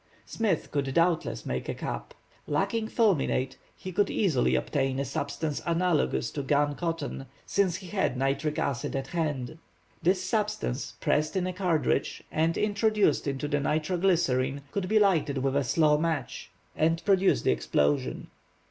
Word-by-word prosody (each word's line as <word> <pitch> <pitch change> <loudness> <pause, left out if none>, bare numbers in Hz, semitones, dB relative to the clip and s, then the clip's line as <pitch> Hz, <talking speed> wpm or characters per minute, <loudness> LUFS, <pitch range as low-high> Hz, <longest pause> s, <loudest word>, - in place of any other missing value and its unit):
Smith 210 -8 -1
could 140 -2 -1
doubtless 165 - +1
make 65 0 -3
a - - -2
cap. - - -5 0.3
Lacking 200 +8 0
fulminate, 175 - +1 0.2
he 185 - -7
could 200 +3 +1
easily 165 - +2
obtain 135 -2 0
a 140 - -1
substance 145 +3 -3
analogous 170 -8 +1
to 145 - -3
gun 145 +1 +2
cotton, 165 -4 -4 0.2
since 195 -4 +1
he 185 - -7
had 190 -10 0
nitric 135 +3 0
acid 130 -1 -2
at 135 -1 -2
hand. 155 -3 -2 0.4
This 185 +3 +2
substance 210 - -2
pressed 155 +5 +1
in 185 -1 +1
a 185 - -2
cartridge, 180 -4 0
and 160 +1 +1
introduced 210 -6 +2
into 140 +1 -2
the 145 0 0
nitro 155 +5 0
glycerine, 140 -7 +1
could 195 -2 -2
be 220 - +3
lighted 160 -9 +3
with 135 +1 0
a 140 - +2
slow 150 +3 +3
match, 160 -5 -2 0.3
and 165 +2 +1
produce 195 -1 +3
the - - +3
explosion. 70 +3 0
155 Hz, 155 wpm, -28 LUFS, 140-185 Hz, 0.4 s, be